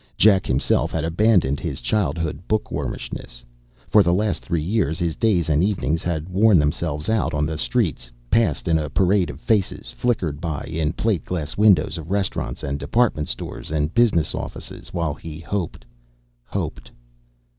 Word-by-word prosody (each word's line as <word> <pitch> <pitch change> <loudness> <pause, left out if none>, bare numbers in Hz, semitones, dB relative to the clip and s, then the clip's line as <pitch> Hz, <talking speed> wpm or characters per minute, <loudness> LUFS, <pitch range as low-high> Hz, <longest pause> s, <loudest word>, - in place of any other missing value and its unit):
Jack 100 -3 +5
himself 65 +1 +1
had 80 - -1
abandoned 85 -5 +3
his - - -3
childhood 85 - -1
bookwormishness. 85 - -3 0.4
For 105 - +6
the 85 -2 +3
last 100 -5 0
three 85 -3 -1
years 85 -4 0
his 85 -3 -1
days 95 -8 +2
and 75 +1 +3
evenings 80 -6 0
had 80 -2 -2
worn 100 +2 +4
themselves 75 0 -1
out 105 -8 +1
on 75 0 +1
the 80 +1 -2
streets, 80 - 0 0.2
passed 115 -5 +2
in 80 -1 +3
a 75 -1 -3
parade 95 +1 +2
of 70 - -8
faces, 105 +1 0
flickered 90 -12 -1
by 80 -4 -3
in 80 0 -2
plate 110 -7 0
glass 80 -5 -4
windows 90 -6 +4
of 80 +1 -9
restaurants 100 -1 -2
and 70 +1 -2
department 115 -7 +1
stores - - -5
and 75 +1 -1
business 105 -10 +3
offices, - - -7
while 85 -4 -1
he 75 +1 -8
hoped, 85 -8 -4 0.6
hoped.... - - -4
85 Hz, 160 wpm, -22 LUFS, 75-100 Hz, 0.6 s, For